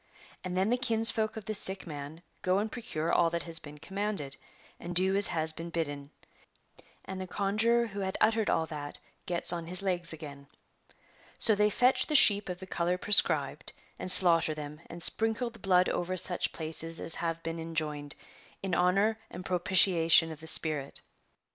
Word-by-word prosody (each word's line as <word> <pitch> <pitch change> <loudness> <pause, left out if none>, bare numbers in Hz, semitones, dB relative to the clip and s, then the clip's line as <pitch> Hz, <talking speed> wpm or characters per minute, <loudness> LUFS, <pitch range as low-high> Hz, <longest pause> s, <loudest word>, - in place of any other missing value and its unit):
And 185 0 -5
then 195 +4 0
the 245 - 0
kinsfolk 225 -2 +1
of 215 - -8
the 215 - -4
sick 190 -1 +2
man 150 +1 -9 0.2
go 185 +1 0
and 215 +2 -2
procure 170 -10 -4
all 170 -1 +3
that 170 0 -4
has 165 -1 -2
been 150 0 -12
commanded, 190 -4 -3 0.4
and 175 +1 -7
do 190 +2 +4
as 200 0 +1
has 160 -2 -3
been 165 +2 -8
bidden, 145 -4 -5 1.0
and 190 0 -7
the 185 - -6
conjuror 220 +5 +1
who 205 -3 -8
had 190 -1 -3
uttered 220 0 +1
all 160 - 0
that 150 -2 -8 0.3
gets 175 0 +3
on 170 -1 -5
his 180 +2 -7
legs 175 -3 -1
again. 145 -3 -9 0.9
So 220 - +2
they 210 0 +2
fetch 250 +5 +2
the 305 - -2
sheep 205 -7 +6
of 180 0 -6
the 190 - -9
colour 180 -1 -2
prescribed, 205 +2 +2 0.3
and 185 - 0
slaughter 165 -4 +5
them, 150 +1 -9
and 170 0 -6
sprinkle 225 +2 +3
the 230 - -14
blood 185 -2 +2
over 185 +1 -3
such 180 0 +2
places 165 +1 -2
as 165 - -4
have 165 -1 -3
been 165 0 -5
enjoined, 150 -3 -4 0.5
in 190 -2 -4
honour 195 +6 +1
and 180 - -10
propitiation 175 -3 +4
of 155 - -10
the 160 - -11
spirit. 155 -4 +1
180 Hz, 180 wpm, -29 LUFS, 160-200 Hz, 1.0 s, sheep